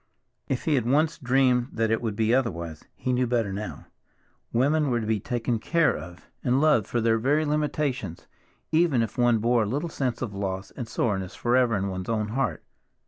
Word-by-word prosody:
If 130 - -2
he 155 - +2
had 125 -5 +1
once 155 +4 +2
dreamed 125 -2 +3
that 115 -1 0
it 115 - +1
would 110 -4 -2
be 110 +1 +2
otherwise, 85 -11 -1
he 130 - -2
knew 125 0 +1
better 115 -5 0
now. 105 +2 -6 0.7
Women 145 +5 +2
were 120 -2 +1
to 110 - -3
be 110 -1 0
taken 120 +1 -2
care 165 +7 +2
of 90 0 -10 0.2
and 125 +2 +2
loved 150 -8 +3
for 120 - -1
their 115 0 +2
very 145 +6 +2
limitations, 145 - -2 0.5
even 155 -7 +3
if 115 - -5
one 120 -1 +4
bore 120 +2 +2
a 105 - 0
little 145 +9 -2
sense 130 -5 -2
of 110 -5 -4
loss 95 -1 -4
and 120 -4 -6
soreness 95 -5 -2
forever 120 -1 +2
in 100 0 -1
one's 95 +1 -5
own 110 -2 0
heart. 135 +5 -1
120 Hz, 195 wpm, -26 LUFS, 110-135 Hz, 0.7 s, one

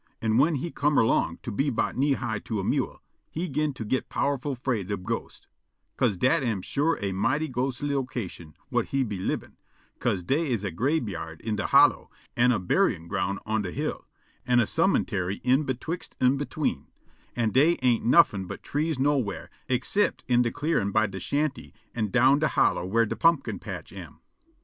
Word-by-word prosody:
An' 110 0 +1
whin 155 +3 +4
he 160 +5 -3
come 145 0 +1
erlong 115 - +2
to 120 - -4
be 140 +8 0
'bout 120 - -1
knee 140 +2 +2
high 115 -5 -2
to 110 -1 -4
a - - -2
mewel, - - -1 0.3
he 170 +3 -3
'gin 150 0 0
to 115 - -6
git 130 +5 -1
powerful 140 0 -1
'fraid 115 -6 -2
ob 95 -3 -3
ghosts, - - -5 0.5
'ca'se 100 - +1
dat 130 +8 +3
am 110 -8 -1
sure 155 +4 0
a 100 - -1
mighty 130 +11 0
ghostly 135 +2 -2
location 115 - -4 0.2
whut - - +1
he 135 -1 0
lib' 100 -6 -2
in, - - -20 0.4
'ca'se 90 - 0
dey 145 - 0
's 105 - -10
a 100 - -2
grabeyard 100 - -2
in 110 -1 -2
de 105 - -2
hollow, - - +5 0.3
an' 125 +1 +4
a 120 - +2
buryin' 85 -2 +1
ground 95 +2 -1
on 110 0 0
de 95 - -4
hill, - - -4 0.4
an' 125 -1 +3
a 120 - +4
cemuntary 95 -1 0
in 130 +4 +3
betwixt 140 +7 -4
an' 130 +1 +4
between, 145 - -2 0.5
an' 115 -3 +1
dey 155 +8 +4
ain't 120 -3 +3
nuffin' 115 - +4
but - - -8
trees 155 +1 -1
nowhar 130 - 0 0.2
excipt 130 +11 +1
in 125 -1 +4
de 120 - +1
clearin' 145 -8 0
by 110 +2 +3
de 95 -2 -6
shanty 145 +5 -2 0.2
an' 110 -3 -1
down 130 +5 +4
de 155 - +2
hollow 90 - +1
whar 115 +4 +3
de - - -3
pumpkin 165 0 +2
patch - - -8
am. - - -10
125 Hz, 190 wpm, -26 LUFS, 105-145 Hz, 0.5 s, hollow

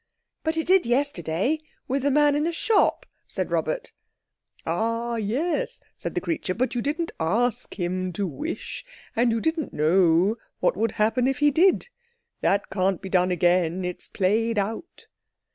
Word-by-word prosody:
"But 320 0 -1
it 320 - 0
did 370 -5 +4
yesterday—with 270 - -1
the 285 - +2
man 290 +1 +4
in 295 - +1
the 335 - +1
shop," 410 +5 +2 0.2
said - - -3
Robert. - - -1 0.7
"Ah 230 +1 -1
yes," 315 - -1 0.2
said - - -5
the - - 0
creature, 305 - -2
"but 255 +1 0
you 245 - -1
didn't 315 +5 -2
ask 225 +8 0
him 185 +1 -1
to 200 +4 -1
wish, 305 - -5 0.3
and 235 +1 +3
you 225 - +1
didn't 320 +4 -1
know 175 +6 +3 0.2
what - - +2
would 225 +2 0
happen 225 +4 +2
if 270 - 0
he 295 0 +4
did. 370 - +3 0.5
That 200 0 +1
can't 190 -1 +1
be 190 - -7
done 180 -1 +3
again. 180 0 +2
It's 180 0 -5
played 220 +4 +1
out." 220 - -3
230 Hz, 160 wpm, -25 LUFS, 185-295 Hz, 0.7 s, did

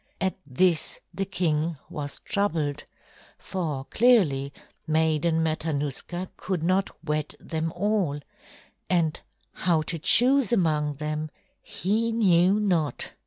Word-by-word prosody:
At 190 -1 0
this 165 +5 +2
the 195 - -2
king 165 -4 -1
was 145 -1 -6
troubled, 165 -8 -1 0.5
for 155 -8 -4
clearly 170 - +3 0.4
Maiden 160 +1 +2
Matanuska 160 +3 -2
could 180 -4 -3
not 185 +3 +2 0.2
wed 150 -1 -2
them 160 0 -3
all, 190 -6 0 0.7
and 165 -4 +1 0.3
how 165 -3 +1
to 165 +1 -3
choose 255 - +5
among 155 -8 +1
them 155 +1 -3 0.3
he 220 +5 -1
knew 195 -3 +4
not. 175 -8 0
165 Hz, 110 wpm, -26 LUFS, 150-190 Hz, 0.7 s, choose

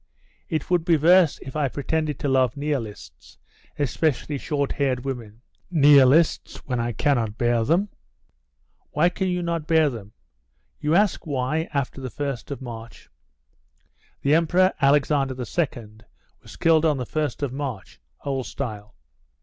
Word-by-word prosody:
It 160 +1 -3
would 175 -2 +3
be 165 -1 +3
worse 170 +1 +5
if 130 - -9
I 150 -2 +1
pretended 150 +2 -2
to - - -3
love 130 0 +2
Nihilists, 115 - -5 0.4
especially 145 0 -1
short 140 -1 -2
haired 130 -3 -1
women 115 -5 -6 0.3
Nihilists, 145 -1 +5
when 125 -3 -2
I 120 0 -1
cannot 115 -2 0
bear 120 -1 +2
them." 170 - +2 1.0
"Why 160 +4 +2
can 190 +2 -2
you 180 -1 -1
not 170 -2 -2
bear 160 -3 +3
them?" 105 -3 -9 0.7
"You 155 +2 +1
ask 200 -3 +2
why, 145 +3 -1
after 140 -1 -3
the 130 - -5
1st 140 -2 -5
of 140 -1 -6
March?" 115 -2 -10 1.1
[The 140 - +3
Emperor 175 +4 +3
Alexander 140 -1 +2
II 120 -6 -3 0.4
was - - -13
killed 165 -1 +3
on 155 -3 +2
the 125 - -3
first 150 0 -3
of 135 -3 -2
March, 135 -8 -6 0.3
old 135 -3 -2
style. 105 - -6
140 Hz, 145 wpm, -24 LUFS, 125-160 Hz, 1.1 s, worse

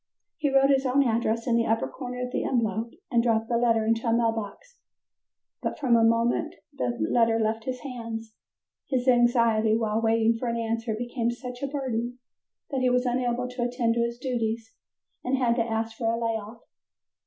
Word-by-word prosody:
He 300 -3 0
wrote 270 0 +4
his 270 -1 +3
own 275 +2 +3
address 230 -1 0
in 240 -3 +2
the 230 0 +2
upper 225 +1 +1
corner 250 -1 -5
of 250 - -8
the - - -1
envelope 225 -2 0 0.2
and 235 -1 +4
dropped 225 -1 +1
the 235 - +2
letter 230 -2 +2
into 225 +1 0
a - - +3
mail 230 0 +3
box. 225 - -7 0.8
But - - -3
from 265 -5 +1
the 230 -1 +5
moment 230 +1 +2 0.2
the 120 -1 -2
letter 230 -1 +3
left 220 0 -1
his 255 -1 -4
hands, 230 -4 -6 0.5
his 255 -2 -1
anxiety 235 -3 +4
while 220 -1 0
waiting 225 0 +2
for 245 - -3
an 235 0 -1
answer 230 0 -2
became 240 +1 -2
such 245 +1 -6
a 275 - -1
burden 250 -4 -3 0.5
that 265 -2 -1
he 255 - +3
was 250 0 +2
unable 245 0 0
to 250 0 -6
attend 240 -1 +1
to 235 - 0
his 235 0 -3
duties, 230 -3 -3 0.5
and 260 +2 0
had 240 -2 +2
to 230 - +3
ask 225 0 -2
for 225 -1 0
a 230 - -2
lay 230 -1 0
off. 220 +2 -8
235 Hz, 200 wpm, -26 LUFS, 225-250 Hz, 0.8 s, the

